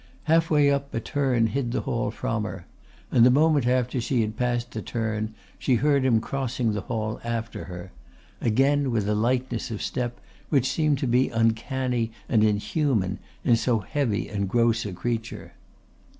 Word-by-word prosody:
Halfway 155 -3 +3
up 140 0 -1
a - - +1
turn 130 -2 +1
hid 120 +1 -1
the - - -1
hall 120 -5 -1
from 115 0 -2
her, 95 -3 -6 0.5
and 115 - +5
the 125 - +8
moment 145 -1 +3
after 125 0 +1
she 120 +1 +1
had 110 -1 -2
passed 120 0 -1
the 110 - -4
turn 110 +1 -3 0.2
she 130 - +2
heard 140 +2 +2
him 120 -4 +4
crossing 125 -2 -2
the 105 - -2
hall 110 -2 -3
after 115 -1 -4
her, 90 0 -8 0.5
again 135 +4 +2
with 110 -4 0
a 105 - +2
lightness 125 +5 0
of 110 -3 -4
step 120 -1 -3 0.3
which 135 -4 +2
seemed 150 0 +2
to 135 - -2
be 125 +2 +3
uncanny 115 +1 0 0.2
and 110 -3 +3
inhuman 105 - +1 0.2
in 120 - +4
so 115 +1 +1
heavy 110 +1 -1
and 100 -2 -2
gross 115 0 +2
a - - -5
creature. 115 +5 -4
120 Hz, 170 wpm, -25 LUFS, 110-130 Hz, 0.5 s, the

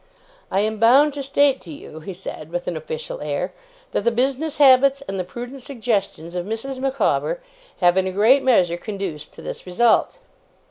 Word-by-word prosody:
'I 190 - +1
am 215 0 -1
bound 270 +6 +5
to 285 - -4
state 275 0 +2
to 170 - -10
you,' 155 +1 -10
he 160 +5 -7
said, 175 -4 -8
with 175 0 -4
an 175 - -2
official 480 - -6
air, - - -3 0.4
'that - - 0
the - - +4
business 265 +6 -1
habits, 275 0 +5
and 195 -1 -3
the - - 0
prudent 245 +8 -8
suggestions, 210 - -3
of 175 - -1
Mrs. 225 +6 -5
Micawber, 275 - 0 0.4
have 175 +1 +4
in 190 0 +2
a - - -2
great 220 +8 +4
measure 180 -10 +3
conduced 195 -6 -6
to - - -11
this - - -7
result. 230 - +2
230 Hz, 185 wpm, -22 LUFS, 185-275 Hz, 0.4 s, bound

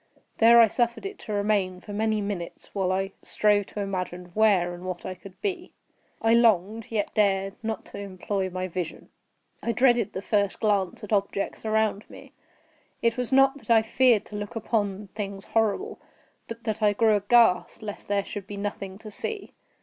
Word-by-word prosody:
There 235 +1 +8
I 230 - +9
suffered 235 - -1
it 395 +1 -6
to 215 - -8
remain 200 -3 0
for 205 - -9
many 215 0 0
minutes, 200 -4 -5
while 190 -2 0
I 195 +1 -1
strove 205 -1 +2
to 205 - -5
imagine 180 -2 -4
where 195 -5 +3
and 175 0 -9
what 185 -1 -5
I 185 - -3
could 185 +1 -14
be. 370 -3 -3 0.5
I 225 0 +4
longed, 220 -2 +3
yet 215 -3 -2
dared 195 -2 +2
not 220 -2 -4
to - - -9
employ 195 0 -3
my 185 0 -3
vision. 180 -2 -5 0.5
I 235 - -1
dreaded 240 -2 +3
the 190 - -5
first 200 -2 0
glance 205 -1 0
at 210 - -4
objects 200 +1 -1
around 220 -1 0
me. - - -13 0.7
It 230 0 +3
was 250 0 -3
not 270 +1 +4
that - - -19
I 225 -1 +6
feared 235 -1 +3
to 210 - -10
look 205 +2 -5
upon 205 -3 -2
things 200 -2 -5
horrible, 225 - 0 0.5
but 230 0 -8
that 220 -1 -3
I 210 -1 +4
grew 220 0 +3
aghast 205 -2 +3
lest 205 -1 -7
there 200 -1 0
should 200 -2 -7
be 205 - -7
nothing 200 -1 -5
to 215 0 -10
see. 415 - -4
205 Hz, 185 wpm, -26 LUFS, 195-225 Hz, 0.7 s, I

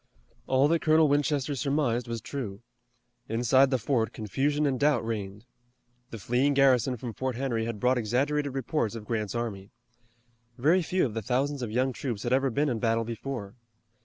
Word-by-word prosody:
All 135 +2 +4
that 165 0 +2
Colonel 155 0 +4
Winchester 145 -1 +1
surmised 130 -3 0
was 115 -1 -4
true. 115 -5 -6 0.7
Inside 125 +4 +4
the 130 - +2
fort 115 -2 0
confusion 140 +8 -1
and 135 -3 0
doubt 145 -5 +2
reigned. 105 -1 -5 0.6
The 115 - -7
fleeing 125 +7 +1
garrison 130 -2 +3
from 115 0 -6
Fort 130 +2 -3
Henry 120 -3 -1
had 115 -2 -4
brought 125 +3 +2
exaggerated 140 +5 0
reports 130 -4 -1
of 110 -2 -7
Grant's 110 -1 -2
army. 105 -5 -4 0.9
Very 160 +9 +3
few 180 +1 +1
of 115 - -4
the 115 - -3
thousands 135 +5 -1
of 120 - -3
young 130 +4 0
troops 120 -5 -4
had 120 - 0
ever 135 +1 +2
been 145 +5 0
in 120 -5 -1
battle 115 -1 +1
before. 115 -2 -5
125 Hz, 175 wpm, -28 LUFS, 115-140 Hz, 0.9 s, All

